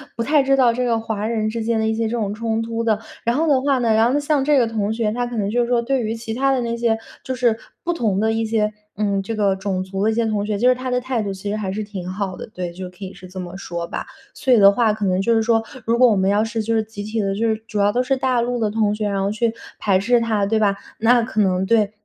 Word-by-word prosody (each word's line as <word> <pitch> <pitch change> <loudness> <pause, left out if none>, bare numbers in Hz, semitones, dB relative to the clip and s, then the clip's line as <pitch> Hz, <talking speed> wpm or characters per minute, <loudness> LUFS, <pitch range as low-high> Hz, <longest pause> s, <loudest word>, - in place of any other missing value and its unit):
不 230 - -1
太 290 +4 +3
知 275 0 +3
道 255 -3 +4
这 250 +2 -1
个 235 -2 +2
华 220 -2 -3
人 220 -2 0
之 230 +1 -3
间 230 0 0
的 220 - +1
一 220 - +1
些 225 +1 -1
这 - - -4
种 205 -4 -1
冲 225 +1 -1
突 230 0 -3
的。 220 -2 +2 0.3
然 235 +1 +2
后 320 +4 +1
的 270 -3 +3
话 275 -1 +2
呢， 235 -2 +1
然 225 +3 +3
后 - - +3
像 290 -2 +1
这 295 0 +4
个 250 - +4
同 215 -2 -1
学， 220 -2 0
他 245 +2 -1
可 240 - -6
能 205 -3 -1
就 240 +3 +1
是 240 - 0
说， 240 -1 +2
对 260 +1 0
于 220 +1 -2
其 225 -1 -6
他 270 +3 +2
的 260 - 0
那 235 0 -2
些 230 -1 +1 0.3
就 260 - -3
是 240 -3 +2 0.3
不 345 - 0
同 220 - 0
的 220 +1 +2
一 225 0 0
些 215 -1 0 0.3
嗯， 200 -2 0
这 225 +4 -4
个 200 -2 +2
种 190 -1 -2
族 195 +1 -3
的 220 - +3
一 - - -1
些 230 +1 +1
同 210 -2 -1
学， 210 -1 -1
就 250 +3 +4
是 255 - +4
他 255 +1 -5
的 250 0 +1
态 250 -2 -1
度 200 -2 -3
其 195 +1 -6
实 210 - -1
还 205 -3 -3
是 215 +3 -3
挺 200 -4 -7
好 185 0 -3
的， - - -7
对， 180 -1 -4
就 185 +2 -7
可 180 - -24
以 190 0 -7
是 185 - -12
这 185 +1 -8
么 180 +1 -7
说 170 -3 -5
吧。 - - -5 0.3
所 265 -3 +2
以 - - +6
的 200 0 +8
话 220 0 +2
可 215 0 -5
能 185 -1 +1
就 230 +4 +2
是 225 - +3
说， 225 0 +2 0.2
如 230 +1 +2
果 250 +1 +6
我 215 - +3
们 190 0 +2
要 205 +2 +3
是 225 0 -2
就 230 +2 -1
是 220 - +3
集 210 -1 -8
体 215 +2 -3
的 195 -2 0
就 225 +2 0
是 220 - +1
主 210 - -3
要 200 0 +3
都 245 +4 +1
是 270 +2 +1
大 260 -2 +1
陆 245 +1 -1
的 220 -2 +1
同 210 -1 +1
学， 210 -1 -2
然 200 -1 -1
后 195 - 0
去 225 +1 0 0.3
排 195 -3 +2
斥 235 +4 +3
他， 220 -3 +1
对 220 +2 +1
吧？ 200 -2 +2 0.2
那 235 +2 +4
可 220 -1 -1
能 185 -1 +1
对 215 -1 +2
220 Hz, 340 characters per minute, -21 LUFS, 205-235 Hz, 0.3 s, 的